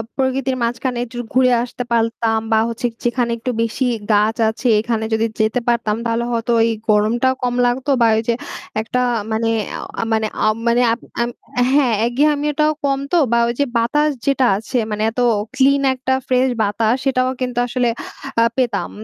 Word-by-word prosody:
প্রকৃতির 265 0 0
মাঝখানে 240 +2 -2
একটু 240 +1 -11 0.2
ঘুরে 255 0 +4
আসতে 245 0 -5
পারতাম 230 -1 +1
বা 220 - +4
হচ্ছে 230 +1 -4
যে 230 - -31
যেখানে 240 -1 0
একটু 240 +2 -3
বেশি 230 +3 -1 0.3
গাছ 210 +2 +3
আছে 230 +3 -3
এখানে 225 0 -1
যদি 220 0 +2
যেতে 220 +3 +1
পারতাম 235 -3 +1
তাহলে 230 +1 0
হয়তো 235 0 -1
ওই 225 - +3 0.2
গরমটাও 225 +5 +3
কম 245 -1 0
লাগতো 250 +3 -1
বা 230 - +6
ওই - - +1
যে 235 - +3 0.5
একটা 235 +3 -2 0.3
মানে 225 +1 0 0.5
আ - - 0
মানে 220 0 +1 0.2
আ - - +4 0.2
মানে 235 +1 +3 0.9
হ্যাঁ 275 -5 +3
একঘেয়ামি 290 +4 +1
টাও 305 0 +4
কম 275 -1 +1
তো 350 - +3
বা 235 - +3
ওই 235 - -1
যে 285 - +3
বাতাস 295 +6 +2 0.2
যেটা 275 -2 +2
আছে 225 +5 -3
মানে 210 0 -2
এত 240 - -6 0.4
ক্লিন 275 +1 +3
একটা 260 0 -2
ফ্রেশ 255 0 +3 0.2
বাতাস 215 +2 +1
সেটাও 255 -1 +2
কিন্তু 250 -1 -3
আসলে 245 0 0 0.5
আ - - +6
পেতাম। 250 -3 0
240 Hz, 175 wpm, -19 LUFS, 225-260 Hz, 0.9 s, বা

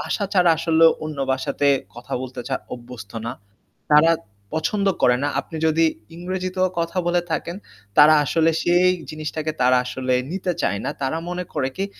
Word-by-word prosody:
ভাষা 205 - -2
ছাড়া 180 -3 +4
আসলে 165 0 +3 0.2
অন্য 155 -2 -6
ভাষা 135 +2 -2
তে 145 - +4 0.3
কথা 120 0 -11
বলতে 130 -1 -7 0.4
অভ্যস্ত 120 -4 -11
না। 120 - -3 0.6
তারা 150 +2 +6 0.4
পছন্দ 200 +6 0 0.2
করে 125 - +5
না। 145 - +1
আপনি 165 - -10
যদি 160 +1 +3 0.3
ইংরেজিতেও 185 +1 -1
কথা 170 +2 -2
বলে 175 0 +2
থাকেন 170 +2 -2 0.4
তারা 150 +1 +8
আসলে 165 +2 +2
সেই 175 +1 +4 0.2
জিনিসটাকে 155 0 -4
তারা 125 +1 +5
আসলে 130 0 -2 0.2
নিতে 185 0 -2
চায় 100 - 0
না। - - -1
তারা 135 +4 -1
মনে 180 0 -3
করে 140 -4 0
কি, 195 - -1
160 Hz, 165 wpm, -22 LUFS, 130-175 Hz, 0.6 s, তারা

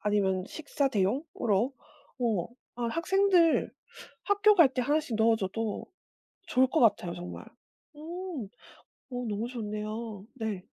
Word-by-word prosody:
아니면 195 -3 +1
식사 285 -2 -1
대용으로 230 - 0 0.5
어 220 -7 0 0.3
아 240 - -2
학생들 345 +3 +3 0.5
학교 410 +1 +5
갈 320 -8 +6
때 255 - +1
하나씩 295 -3 0
넣어 225 +1 +4
줘도 210 +1 -3 0.6
좋을 260 +1 +4
것 315 - +1
같아요 190 -7 +3
정말. 175 0 -7 0.5
음. 330 - -6 0.6
어 245 0 -3
너무 210 +3 -2
좋네요. 215 -2 -5
네. 220 -6 -3
235 Hz, 230 characters per minute, -29 LUFS, 210-305 Hz, 0.6 s, 갈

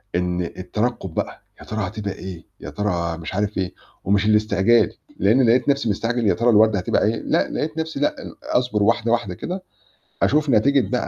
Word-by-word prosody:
إن 90 0 0
الترقب 95 +2 -3
بقى، - - -4 0.2
يا - - -12
ترى 110 -3 -3
هتبقى 100 -1 -4
إيه، 95 -3 -9
يا - - -7
ترى 85 -5 -2
مش 80 0 -7
عارف 105 +1 -1
إيه، 95 -2 -2 0.3
ومش 100 +2 +2
الاستعجال، 105 0 +3 0.2
لإني 110 +8 +4
لقيت 125 +4 +3
نفْسي 140 -4 +1
مستعجل 115 +3 0
يا - - +4
ترى 120 +1 +1
الوردة 110 -2 +5
هتبقى 90 - +1
إيه، 110 - +1
لأ - - 0
لقيت 155 +1 -3
نفْسي 160 -2 -3
لأ 145 - 0
ال - - -9
أصبر 125 -4 0
واحدة، 115 +1 +2
واحدة 115 -6 0
كده، 185 - -5 0.6
أشوف 150 +1 +2
نتيجة 130 -1 +3
بقى 125 - -1
110 Hz, 190 wpm, -22 LUFS, 95-120 Hz, 0.6 s, الوردة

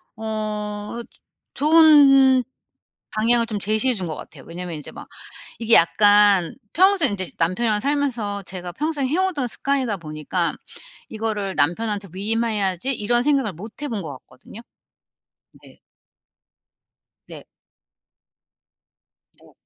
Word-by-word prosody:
어 220 - -14
어 210 0 -4
즈 - - -20 0.3
좋은 280 -4 +6 0.7
방향을 230 +2 +2
좀 210 -3 -4
제시해 220 +6 +1
준 185 -3 -4
거 155 - -5
같아요. 140 -3 -12
왜냐하면 170 -1 -6
이제 150 - -10
막 - - -11 0.5
이게 230 0 +4
약간 205 0 +4 0.2
평생 370 - +3
이제 185 -3 -5
남편이랑 210 +6 +1
살면서 245 -8 -2
제가 180 -1 -7
평생 295 - -2
해 305 - -1
오던 360 -9 0
습관이다 260 -6 -1
보니까 155 +2 -3 0.6
'이거를 215 -3 -3
남편한테 200 +5 -1
위임해야지.' 210 +1 -1
이런 240 +3 +1
생각을 275 -8 +1
못 210 - -11
해 - - -2
본 220 -6 -4
것 160 - -7
같거든요. 130 - -15 1.0
네. - - -18 1.5
네. - - -11 2.0
네. - - -20
215 Hz, 245 characters per minute, -22 LUFS, 190-260 Hz, 2.0 s, 좋은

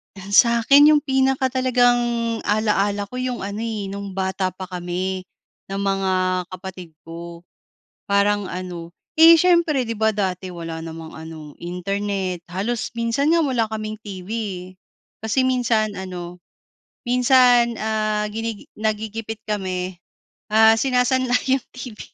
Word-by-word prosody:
Ah, 195 +1 -10
sakin 260 +8 +6
yung 295 - +1
pinaka 265 -1 +1
talagang 250 -2 +3 0.5
ala-ala 205 -1 +1
ko 250 +5 -7
yung 255 -3 -3
ano, 200 +2 -4
eh, 215 -4 -3
nung 200 -1 -6
bata 190 0 -1
pa 185 +1 -7
kami 185 +1 -4 0.4
ng 195 - -5
mga 195 -1 0 0.4
kapatid 185 -3 -9
ko 170 +1 -9 0.6
parang 200 0 +2
ano, 175 -2 -6 0.3
eh, 330 +1 +10
siyempre 340 -6 +3
'di - - -3
ba 220 0 +3
dati 190 -2 -2
wala 165 -1 -6
namang 165 -1 -8
ano 160 -2 -9
internet. 190 +1 -3
Halos 220 +6 -2
minsan 235 +7 +1
nga 335 - +3
wala 250 -6 +1
kaming 215 0 -4
TV, 195 -3 -9 0.4
eh, 185 - -25 0.4
kasi 225 +4 +1
minsan 235 -4 +1
ano 180 -1 -7 0.7
minsan, 245 -1 +4
ah, 215 -1 0
ginigi 225 -1 -5
nagigipit 220 +1 -3
kami, 185 -3 -3 0.5
ah, 220 +1 +6
sinasanla 255 0 +2
yung 265 -1 +1
TV. 245 -4 -8
210 Hz, 130 wpm, -22 LUFS, 185-245 Hz, 0.7 s, eh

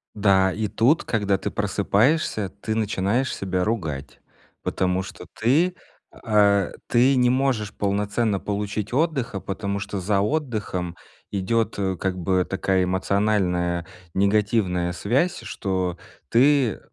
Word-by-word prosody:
Да, 95 -2 +4
и 110 +3 -2
тут, 115 +10 +2
когда 100 -3 0
ты - - -4
просыпаешься, 105 +3 +1
ты 100 +3 -4
начинаешь 110 +3 0
себя 95 -1 -1
ругать, 80 -10 -3 0.4
потому 90 0 0
что 95 - -10
ты, 160 +11 +3 0.4
а, 100 -4 +2 0.2
ты 125 +3 +4
не 125 -1 +4
можешь 125 -5 0
полноценно 105 +1 0
получить 105 +1 -3
отдыха, 135 -8 0
потому 100 +1 -3
что 100 0 -4
за 100 +2 +1
отдыхом 105 - -2 0.4
идет, 105 +4 0
э, 95 -2 0
как 95 +1 -2
бы 90 +1 +1
такая 95 0 0
эмоциональная 90 -2 0 0.3
негативная 100 -3 +1
связь, 125 - 0
что 95 -4 -2 0.3
ты— 130 -1 +3
100 Hz, 120 wpm, -24 LUFS, 95-115 Hz, 0.4 s, Да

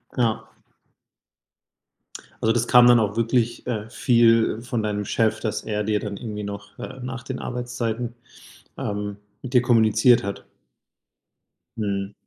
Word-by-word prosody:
Ja. 110 -3 -1 1.9
Also, 110 - +3
das 120 0 0
kam 125 0 +7
dann 120 -1 +7
auch 105 -1 -1
wirklich, 115 0 0
äh, 110 -2 -3
viel 115 -3 +3
von 120 -2 -3
deinem 105 -1 -2
Chef, 110 +2 +1
dass 110 -2 -3
er 105 -1 -2
dir 105 0 0
dann 100 -2 -5
irgendwie 105 -3 -6
noch 100 0 -8
äh, 130 +2 -8
nach 125 0 -6
den 130 -1 -5
Arbeitszeiten, 120 -1 -3 0.6
ähm, 105 0 -4 0.3
mit 130 0 -7
dir 125 - +6
kommuniziert 115 0 +4
hat? 100 0 -5 1.3
Mhm. 100 -2 -2
115 Hz, 135 wpm, -23 LUFS, 105-120 Hz, 1.9 s, kam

